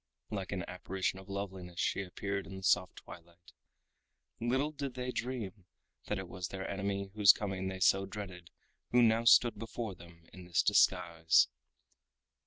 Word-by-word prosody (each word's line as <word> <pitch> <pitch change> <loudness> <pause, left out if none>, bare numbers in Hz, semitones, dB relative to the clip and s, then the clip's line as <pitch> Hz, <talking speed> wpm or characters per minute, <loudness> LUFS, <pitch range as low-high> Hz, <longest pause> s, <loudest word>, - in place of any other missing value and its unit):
Like 95 -4 -4
an 90 -3 -3
apparition 95 +1 -3
of 95 - -14
loveliness 95 -3 -6
she - - +1
appeared 100 0 -4
in 95 - -8
the 95 - -9
soft 90 0 +2
twilight. 85 +1 -14 0.9
Little 130 +6 0
did 140 -4 -5
they 125 0 -3
dream 115 -7 -4 0.4
that 105 - -2
it 95 -2 -5
was 90 0 -5
their 95 +1 -5
enemy 100 0 -3
whose 105 -2 +8
coming 95 -2 -3
they 95 0 -5
so 95 +2 +4
dreaded 95 -4 -8 0.4
who 120 0 +5
now 115 0 +3
stood 115 -1 +6
before 115 -1 -5
them 85 -1 -15
in 95 -1 -11
this 90 -1 +2
disguise. 80 -1 +4
95 Hz, 160 wpm, -33 LUFS, 90-105 Hz, 0.9 s, whose